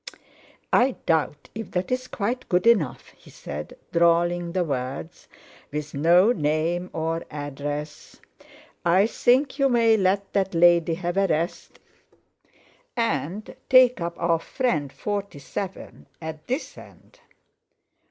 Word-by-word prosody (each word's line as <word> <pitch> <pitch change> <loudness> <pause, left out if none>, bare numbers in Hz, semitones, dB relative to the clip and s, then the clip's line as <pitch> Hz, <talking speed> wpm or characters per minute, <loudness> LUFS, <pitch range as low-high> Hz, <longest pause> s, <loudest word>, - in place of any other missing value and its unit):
"I 250 +1 +4
doubt 150 -3 0
if 225 +1 -6
that's 255 +8 -2
quite 240 +4 -3
good 180 +3 +2
enough," 205 - +2
he - - -19
said, 75 +1 -8
drawling 170 0 +2
the 185 -1 +1
words, 140 +1 -5 0.4
"with 150 0 -5
no 170 +9 +5
name 165 0 0
or 165 +1 -2
address. 145 +1 -6 0.6
I 180 +4 +4
think 260 +5 +2
you 275 0 +4
may 230 -2 +4
let 195 0 0
that 195 -2 0
lady 170 -1 +4
have 175 +1 -3
a 195 0 +3
rest, 165 +1 -2 1.2
and 195 - -2
take 255 -5 +6
up 170 0 -3
our 170 -1 +1
friend 160 - -1
47 200 -1 -5
at 160 -1 -8
this 260 +5 -4
end." - - -17
175 Hz, 120 wpm, -24 LUFS, 155-210 Hz, 1.2 s, take